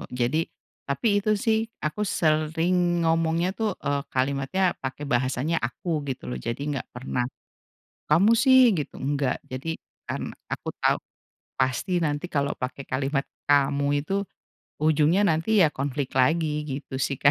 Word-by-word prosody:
Jadi 130 +7 +1 0.4
tapi 205 +8 +2
itu, 215 +1 +2
sih, 220 +1 +1 0.2
aku 155 +7 -2
sering 170 +1 +1
ngomongnya 165 +2 +2
tuh, 215 -2 -2
eee, 140 0 +1
kalimatnya 140 +8 +1
pakai 130 +2 -4
bahasanya 130 +5 0
aku, 150 +7 -2
gitu, 130 - -4
loh. - - -3
Jadi 115 - -4
enggak 135 - -4
pernah, 125 0 -2 0.9
"Kamu, 195 +9 +6
sih!" 255 -1 +6
gitu, 150 - -5
enggak. 140 -1 0
Jadi 140 +6 -4 0.3
kan - - -4 0.2
aku - - -4
tau, - - +3 0.6
pasti 130 +8 +1
nanti 145 +2 -1
kalau 140 -3 0
pakai 130 +2 -5
kalimat 135 +1 0 0.2
kamu 140 0 +3 0.2
itu 195 - -2 0.7
ujungnya 155 +5 +4
nanti, 185 +5 +3
ya, 155 - +4
konflik 140 -1 -3
lagi 150 +2 +2
gitu, 135 -1 -5
sih, 140 +1 0
Kak, 140 - +7
150 Hz, 140 wpm, -26 LUFS, 135-175 Hz, 0.9 s, Kak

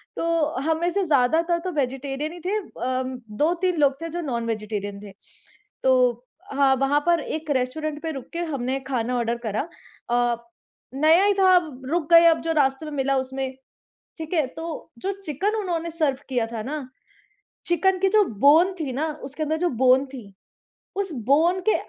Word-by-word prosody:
तो 330 -2 0
हम 320 +3 0
में 345 - +2
से 400 +1 0
ज़्यादातर 320 +3 +2
तो 370 - -2
वेजिटेरियन 275 +2 -2
ही 350 - -10
थे। 415 +3 +1
अ, 255 -8 -3 0.4
2-3 350 +2 +1
लोग 280 0 +2
थे 330 - -4
जो 345 +2 -4
नॉन-वेजिटेरियन 215 -6 -3
थे, 200 - -10 0.7
तो 250 -2 +3 0.3
हाँ, 275 -1 +4
वहाँ 275 +2 +2
पर 340 -1 +4
एक 310 -1 -5
रेस्टोरेंट 300 +4 -3
पे 320 - -2
रुक 270 -4 -7
के 335 - -3
हमने 260 0 -1
खाना 250 -2 -1
ऑर्डर 235 0 -1
करा, 215 0 -1 0.5
अ, 240 0 +2 0.6
नया 320 +6 +5
ही 410 - +4
था 375 -1 +6
अब 305 -7 0
रुक 335 -2 0
गए 335 0 +9
अब 325 -1 +4
जो 330 - -1
रास्ते 275 0 +1
में 305 - -6
मिला 275 0 +1
उसमें 265 0 -3 0.6
ठीक 320 +2 -6
है, 310 -5 +3
तो 325 +3 -7
जो 390 - -2
चिकन 375 +9 -1
उन्होंने 340 -5 -2
सर्व 305 -5 0
किया 245 -3 0
था 225 -1 -5
न, 290 -3 -4 0.8
चिकन 370 +2 +2
की 385 0 +3
जो 425 0 +5 0.2
बोन 335 +6 +6
थी 275 -4 -2
न, 275 - -3 0.2
उसके 280 +4 -4
अंदर 315 +1 -1
जो 355 0 +1
बोन 260 +2 +5
थी, 235 -7 -11 0.6
उस 390 -4 -2
बोन 330 +7 +3
के - - +5
295 Hz, 180 wpm, -24 LUFS, 260-335 Hz, 0.8 s, गए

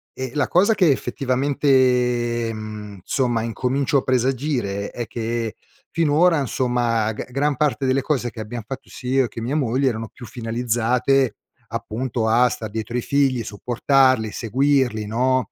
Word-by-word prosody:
e 130 0 -4
la 145 -2 +1
cosa 200 +5 +3
che 180 -7 +4
effettivamente, 125 -4 +1
mhmm, 105 -2 -8
somma 120 0 0
incomincio 130 +5 0
a - - +2
presagire 125 -5 -1
è 120 -2 -5
che 115 0 -3 0.3
finora 165 +1 +3
insomma, 120 -4 0
g 120 - -7
gran 140 +3 +1
parte 140 -1 0
delle 130 +1 +2
cose 130 -5 0
che 115 - -11
abbiam 115 +2 -5
fatto 130 +4 -8
sia 125 - -7
io - - +3
e - - -4
che 115 - -8
mia 125 +6 -2
moglie 135 -1 +1
erano 115 -2 -4
più 120 - -12
finalizzate 120 +2 0 0.3
appunto, 115 +1 -3
a 120 +3 +5
star 110 -2 -4
dietro 110 +2 -5
i 125 - +1
figli, 135 -2 +1
supportarli, 120 +2 +2
seguirli, 125 -2 +1
no; 125 +4 +2
125 Hz, 155 wpm, -22 LUFS, 115-135 Hz, 0.3 s, a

